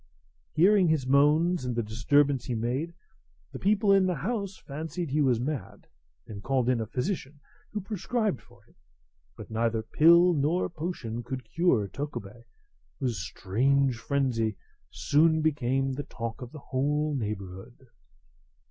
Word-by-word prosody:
Hearing 190 +2 +5
his 155 -5 +1
moans 150 +5 +3
and 125 -2 -2
the 120 - 0
disturbance 130 +4 +2
he 125 - -2
made, 130 +9 -2 0.6
the - - -7
people 205 +1 +2
in 195 -1 +4
the 180 - 0
house 200 - -3
fancied 160 +2 -5
he 150 +2 +2
was 125 -5 +3
mad, 140 +2 -5 0.4
and 100 -2 -8
called 130 +2 0
in 125 -3 +1
a 110 - -4
physician, 145 - -3 0.3
who 210 - -4
prescribed 210 - -2
for - - -22
him. - - -27 0.6
But - - -10
neither 115 0 0
pill 170 +7 +5
nor 155 +4 +1
potion 150 -9 -4
could 130 0 -6
cure 130 - +1
Tokubei, 120 -4 -7 0.5
whose 120 -7 -1
strange 125 +9 0
frenzy 120 -6 0 0.3
soon 160 +2 +3
became 135 -3 0
the 140 - -3
talk 115 +1 -6
of 125 -1 -8
the - - -9 0.2
whole 150 +3 +1
neighbourhood. 105 +1 -6
140 Hz, 145 wpm, -28 LUFS, 120-165 Hz, 0.6 s, Hearing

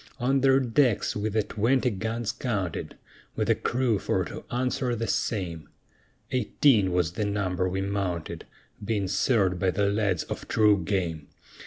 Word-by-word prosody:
On 135 +2 +2
their 135 0 +5
decks 125 -3 +1
we 105 +1 -1
the 110 0 +1
twenty 125 +5 +1
guns 110 +2 -2
counted, 100 -9 -3 0.4
With - - +1
a - - +6
crew 120 -4 0
for - - 0
to - - -8
answer 125 0 -1
the 115 0 -2
same; 90 -7 -2 0.6
Eighteen 115 -4 +3
was 90 -2 +1
the 100 +5 -2
number 95 -3 -1
we 95 +1 -2
mounted, 95 -4 -3 0.4
Being 100 -2 -1
served 95 -5 +2
by 95 - +2
the 100 +2 +1
lads 100 -5 0
of - - -7
true 105 -4 +3
game. 85 -5 -2
105 Hz, 155 wpm, -27 LUFS, 95-120 Hz, 0.6 s, a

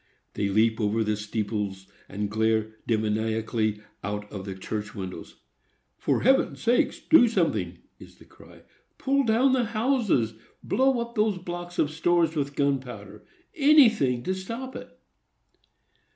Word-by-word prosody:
They 100 -1 -1
leap 110 +3 +2
over 110 +2 +1
the 105 0 0
steeples, 105 -2 -4 0.2
and 105 +1 -3
glare 110 0 0
demoniacally 110 0 -1 0.2
out 105 +1 -4
of 95 -2 -7
the 95 -2 -6
church 105 +3 -5
windows. 95 -2 -7 0.6
"For - - 0
Heaven's 265 +3 +3
sake, 240 +1 0
DO 280 -7 +8
SOMETHING!" 110 - -1 0.2
is - - -14
the - - -18
cry. - - -18 0.3
"Pull 275 0 +1
down 240 +4 +3
the 250 -2 +2
houses! 220 - +1 0.3
Blow 260 +4 +2
up 235 0 -6
those 210 -3 +1
blocks 175 0 -7
of 150 - +1
stores 165 0 +1
with 140 -1 -2
gunpowder! 125 -8 -3 0.3
Anything 230 - +4
to 185 - -1
stop 230 +8 -6
it." - - -10
125 Hz, 135 wpm, -26 LUFS, -, 0.6 s, DO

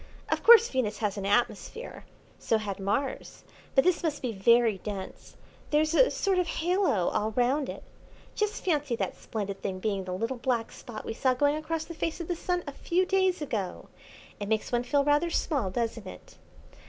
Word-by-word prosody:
Of - - 0
course 465 0 +8
Venus 235 -5 -1
has 210 -2 -1
an 200 -1 -3
atmosphere. 240 - -1 0.3
So 225 - +1
had 205 -3 -4
Mars; 260 +8 -2 0.3
but 270 - +6
this 365 -2 +2
must 310 -5 -2
be 250 - -1
very 225 0 +3
dense. 195 -1 -7 0.3
There's 310 +1 +2
a - - +5
sort 385 -2 +1
of 360 - 0
halo 340 - +1
all 215 +1 -1
round 260 +3 +1
it. - - -7 0.5
Just 420 0 -2
fancy 295 -8 +1
that - - -3
splendid 200 -3 -5
thing 190 -2 -3
being 195 -2 -2
the 180 - -4
little 230 +7 -2
black 235 -3 -1
spot 220 -3 -9
we - - -3
saw 255 +2 +1
going 285 +3 +2
across 315 +1 -3
the 335 - -8
face 325 +1 -3
of 340 - -5
the 350 - 0
Sun 355 +1 -2
a 285 - -5
few 350 +6 0
days 375 -3 +1
ago! 210 -10 -4 0.5
It 205 -1 -4
makes 220 -1 0
one 240 -1 +2
feel 280 +3 +1
rather 295 +4 +2
small, 280 - 0
doesn't 225 0 -3
it?" - - -12
255 Hz, 190 wpm, -28 LUFS, 215-330 Hz, 0.5 s, course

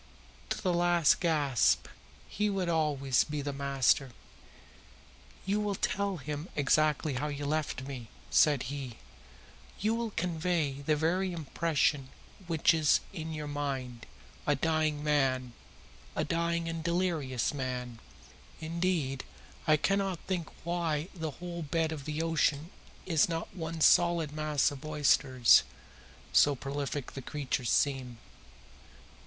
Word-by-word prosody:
To - - -2
the 185 -3 0
last 175 -3 +4
gasp 145 - +2 0.4
he 210 +1 -1
would 190 -3 -1
always 145 -5 +2
be 150 -1 -4
the 145 0 -3
master. 135 -1 +2 1.4
"You 200 +2 +1
will 205 -1 -1
tell 200 0 -1
him 150 +3 -5
exactly 150 +1 +2
how 135 +4 -2
you 145 -1 -4
have - - -2
left 155 -4 -1
me," 130 -4 -7 0.2
said 145 -4 +4
he. 130 -5 -6 0.8
"You 215 +3 +1
will 230 0 -2
convey 165 -6 -1
the 150 +2 +1
very 180 +5 0
impression 150 -3 0 0.4
which 165 0 +3
is 155 -3 +3
in 160 -3 -5
your 150 -1 -4
own 145 - -6
mind 130 -5 -4 0.4
a 145 - +4
dying 155 0 0
man 130 -4 +1 0.6
a - - 0
dying 170 0 -1
and 165 -1 -4
delirious 165 -9 0
man. 125 -4 -4 0.6
Indeed, 160 -5 -1 0.4
I 155 -1 +5
cannot 195 +2 0
think 180 -4 -3
why 170 -1 -1
the 160 -3 -4
whole 175 -1 -6
bed 160 +1 0
of 145 -4 -6
the 155 +1 -2
ocean 160 0 +1 0.3
is 165 -3 +3
not 165 0 -4
one 165 -2 -5
solid 170 -2 +4
mass 150 -2 +1
of 140 -2 -9
oysters, 135 -4 +4 0.7
so 145 -1 +5
prolific 140 0 -4
the 135 - -7
creatures 130 -4 -3
seem. 130 -4 +1
155 Hz, 135 wpm, -30 LUFS, 140-170 Hz, 1.4 s, I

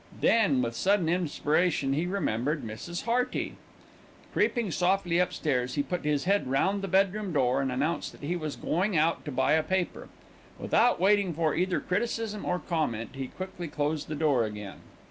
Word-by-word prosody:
Then, 155 - +3
with 115 0 -3
sudden 190 - +2
inspiration, 160 -3 +1
he 160 +5 0
remembered 150 - -1
Mrs. 140 +11 -6
Hearty. 245 +2 0 0.8
Creeping 235 -7 +1
softly 180 0 +1
upstairs, 135 -8 0
he 145 - +1
put 165 +3 -4
his 150 -2 +1
head 200 -2 +1
round 190 +9 +1
the 195 - -3
bedroom 195 +1 +1
door 135 -3 +2
and 135 -1 -1
announced 145 +7 -1
that - - -15
he 175 +4 -1
was 155 -4 -4
going 185 +2 0
out 160 +2 +2
to 150 - -4
buy 130 0 +1
a 160 - +4
paper. 185 +2 -2 0.5
Without 240 +2 +2
waiting 195 -2 +3
for 160 -2 +1
either 180 +1 +1
criticism 215 +1 -2
or 180 - +1
comment, 150 - -2
he 135 -1 -4
quickly 185 0 -7
closed 150 0 -2
the 155 - -4
door 145 -5 +2
again. 105 -2 -6
165 Hz, 170 wpm, -28 LUFS, 140-190 Hz, 0.8 s, a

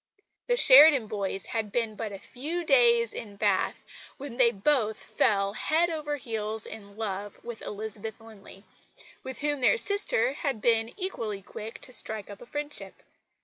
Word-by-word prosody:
The 485 0 +2
Sheridan 280 - +8
boys 195 -2 -3
had 220 -3 -3
been 225 -2 -1
but 215 -1 -5
a 200 - -6
few 300 - -5
days 235 -6 +4
in 205 -2 -8
Bath 200 -2 0 0.3
when 275 -4 -8
they 250 -3 +6
both 220 0 +1
fell 200 -1 +1
head 330 +9 +2
over 300 -2 -3
heels 220 -3 -4
in 200 -1 -11
love 205 -2 -4
with 235 -1 -7
Elizabeth 215 +1 -6
Linley, 210 -3 -14 0.6
with 260 0 -7
whom 290 -2 -1
their 480 - +4
sister 400 - +1
had 275 -5 -2
been 225 0 +2
equally 225 - -4
quick 220 +3 -9
to 255 - -7
strike 215 -2 -3
up 200 - -11
a 245 - -12
friendship. 295 +2 -6
225 Hz, 160 wpm, -28 LUFS, 210-280 Hz, 0.6 s, Sheridan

